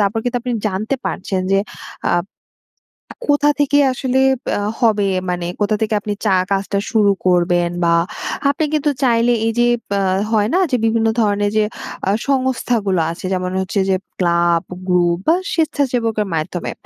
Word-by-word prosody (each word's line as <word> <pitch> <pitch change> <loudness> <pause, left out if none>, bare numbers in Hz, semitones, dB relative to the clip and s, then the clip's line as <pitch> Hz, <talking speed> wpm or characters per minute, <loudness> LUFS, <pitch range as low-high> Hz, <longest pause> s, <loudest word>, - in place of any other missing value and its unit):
তারপর 205 +2 +1
কিন্তু 245 0 -1
আপনি 250 0 -2 0.2
জানতে 210 +6 -2
পারছেন, 190 0 -2
যে 195 - +4 0.6
আব 175 0 +1 1.0
কোথা 290 0 +4
থেকে 285 0 +3
আসলে 260 0 0 0.3
বা - - 0 0.2
হবে, 210 -4 +3 0.2
মানে 175 -1 -2
কোথা 210 +1 +1
থেকে 220 0 0
আপনি 205 0 -3
চা 190 -2 +4
কাজটা 200 0 0
শুরু 210 -3 +4
করবেন, 175 -1 +2
বা 170 - +3 0.6
আপনি 285 +3 0
কিন্তু 300 0 +1
চাইলে, 240 -1 +3
এই 225 - +1
যে 240 - +4 0.2
বা 200 0 +1 0.3
হয় 210 -1 +2
না? 370 - +4
যে 255 - +2
বিভিন্ন 225 0 +2
ধরনের 205 -1 +1
যে 215 - +3 0.4
আ - - +3 0.2
সংস্থাগুলো 245 -8 0
আছে, 170 - -8
যেমন 180 0 -2
হচ্ছে 190 +2 -1
যে 190 - +3 0.2
ক্লাব 170 -1 +2 0.3
গ্রুপ, 175 -1 +2
বা 325 - +6 0.2
স্বেচ্ছাসেবকের 245 -9 0
মাধ্যমে। 160 +2 -3
210 Hz, 155 wpm, -18 LUFS, 185-245 Hz, 1.0 s, বা